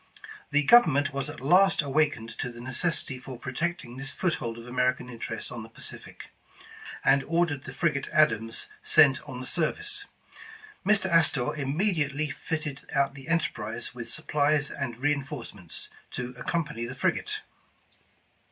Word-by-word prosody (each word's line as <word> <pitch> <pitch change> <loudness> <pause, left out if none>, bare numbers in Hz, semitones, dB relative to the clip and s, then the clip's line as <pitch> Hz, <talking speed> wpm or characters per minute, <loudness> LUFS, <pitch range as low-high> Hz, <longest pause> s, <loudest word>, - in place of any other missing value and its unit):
The 145 0 +3
Government 145 - +6
was 140 +1 -2
at 150 - -7
last 180 +5 +5
awakened 135 -6 0
to - - -1
the 120 - -11
necessity 130 +2 -2
for 130 0 -8
protecting 130 0 -3
this 135 0 -3
foothold 120 -10 -1
of 115 - -9
American 125 0 0
interest 115 -2 -5
on 120 - -5
the 110 - -10
Pacific, - - -9 0.7
and 135 0 +5
ordered 165 -4 0
the - - -6
frigate 150 -6 0
Adams 115 -8 +2
sent 145 -4 +5
on 125 -2 -6
the 130 - -6
service. 410 - 0 0.8
Mr. 200 -1 +3
Astor 155 -6 +3
immediate^ 150 -1 0
fitted 150 -1 -4
out 140 0 +2
the 135 0 -11
Enterprise 120 -9 -1
with 120 -2 -6
supplies 150 0 +1
and 125 -5 -4
reinforcements, 135 - -3 0.2
to 125 0 -4
ac 125 - -9
company 150 -8 -1
the 125 - -7
frigate. - - 0
140 Hz, 145 wpm, -28 LUFS, 125-155 Hz, 0.8 s, Government